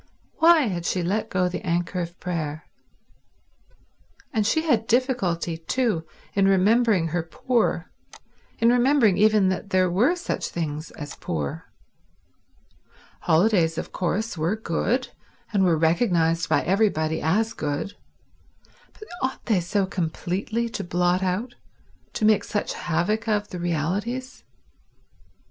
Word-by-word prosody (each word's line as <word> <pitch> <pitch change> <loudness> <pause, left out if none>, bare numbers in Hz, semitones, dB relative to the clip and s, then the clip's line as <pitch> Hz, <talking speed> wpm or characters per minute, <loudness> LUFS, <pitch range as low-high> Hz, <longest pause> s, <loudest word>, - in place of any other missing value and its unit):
Why 330 0 +7
had 180 - -2
she 180 - 0
let 200 +5 -1
go 185 -1 +1
the 180 - -5
anchor 175 +1 -1
of 170 +1 -7
prayer? 160 -3 -4 1.7
And 215 -3 +1
she 315 +8 +2
had 235 -9 +1
difficulty, 195 -10 0
too, 175 -1 -1 0.3
in 195 -1 +3
remembering 195 -2 +3
her 175 +2 -1
poor, 230 +9 -1 0.7
in 230 - +4
remembering 245 -4 +4
even 215 -2 +4
that 190 +2 -3
there 185 -2 +2
were 240 - +3
such 355 - -3
things 155 -2 -4
as 145 -2 -8
poor. 75 -4 -4 1.5
Holidays, 165 -2 +2
of - - -5
course, 195 +5 -2
were 165 +5 0
good, 220 +5 -1 0.4
and 200 -2 +3
were 170 -3 +3
recognized 165 -1 +2
by - - +2
everybody 170 -5 +1
as 215 +8 +1
good, 150 +6 -3 1.0
but - - -13 0.2
ought 260 0 -3
they 215 -6 +2
so 190 +3 0
completely 190 +6 -2
to 210 -3 -4
blot 175 +1 +1
out, 190 +7 -2 0.6
to 215 - 0
make 215 -1 +4
such 205 - -2
havoc 185 +7 -1
of, 210 -1 0
the 180 - -6
realities? 190 - -2
190 Hz, 130 wpm, -24 LUFS, 170-225 Hz, 1.7 s, Why